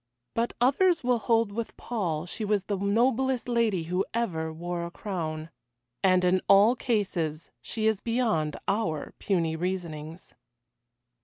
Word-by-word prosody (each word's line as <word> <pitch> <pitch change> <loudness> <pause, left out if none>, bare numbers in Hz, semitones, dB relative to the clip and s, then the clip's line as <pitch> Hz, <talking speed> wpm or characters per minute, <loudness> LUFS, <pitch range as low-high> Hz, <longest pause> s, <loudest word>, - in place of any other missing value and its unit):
But 230 +1 0
others 330 +7 +3
will 245 -1 +2
hold 225 -1 +2
with 230 +2 -5
Paul 175 -9 -2
she 215 +5 -5
was 205 -2 +1
the 200 +1 -2
noblest 240 +6 +1
lady 230 -7 +1
who 180 +4 0
ever 160 -9 -1
wore 170 +2 -4
a 170 - -4
crown. 165 -5 -4 0.5
And 185 -1 +4
in 185 +1 +3
all 205 +5 +7
cases 185 - -1
she 220 -1 -3
is 220 -2 +2
beyond 225 -11 0
our 175 -8 -1
puny 170 -5 0
reasonings. 165 -2 -5
195 Hz, 140 wpm, -28 LUFS, 170-230 Hz, 0.5 s, all